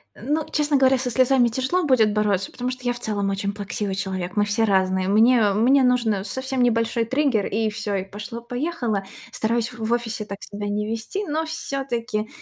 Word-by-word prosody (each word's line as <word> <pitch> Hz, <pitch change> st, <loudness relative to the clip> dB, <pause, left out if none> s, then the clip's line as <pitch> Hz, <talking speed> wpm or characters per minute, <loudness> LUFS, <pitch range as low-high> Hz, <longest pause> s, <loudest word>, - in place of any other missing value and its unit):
Ну, 300 Hz, +6 st, -1 dB
честно 295 Hz, -1 st, +2 dB
говоря, 265 Hz, 0 st, +4 dB
со 250 Hz, -1 st, -2 dB
слезами 255 Hz, 0 st, +4 dB
тяжело 260 Hz, +10 st, 0 dB
будет 240 Hz, -7 st, +4 dB
бороться, 205 Hz, -2 st, 0 dB
потому 250 Hz, 0 st, -3 dB
что 255 Hz, 0 st, -7 dB
я 245 Hz, -, +1 dB
в 240 Hz, -, -8 dB
целом 205 Hz, -4 st, -1 dB
очень 200 Hz, +1 st, -2 dB
плаксивый 205 Hz, -1 st, -3 dB
человек. 190 Hz, -2 st, -3 dB
Мы 205 Hz, 0 st, +3 dB
все 210 Hz, +2 st, 0 dB
разные, 190 Hz, -2 st, +2 dB
мне 220 Hz, +1 st, +4 dB
мне 255 Hz, +6 st, +4 dB
нужно 235 Hz, -6 st, +2 dB
совсем 260 Hz, +3 st, -2 dB
небольшой 230 Hz, -1 st, +1 dB
триггер, 260 Hz, -4 st, +1 dB
и 220 Hz, +1 st, 0 dB
всё, 210 Hz, -1 st, -4 dB
и 190 Hz, -, -1 dB
пошло-поехало. 235 Hz, -, -4 dB, 0.3 s
Стараюсь 230 Hz, +1 st, -1 dB
в 230 Hz, -2 st, -8 dB
в 235 Hz, -, +2 dB
офисе 225 Hz, -3 st, -2 dB
так 200 Hz, -1 st, -6 dB
себя 205 Hz, 0 st, -6 dB
не 210 Hz, +1 st, -2 dB
вести, 225 Hz, -, -3 dB
но 315 Hz, +2 st, -1 dB
всё-таки, 240 Hz, -8 st, -3 dB
225 Hz, 190 wpm, -23 LUFS, 205-255 Hz, 0.3 s, говоря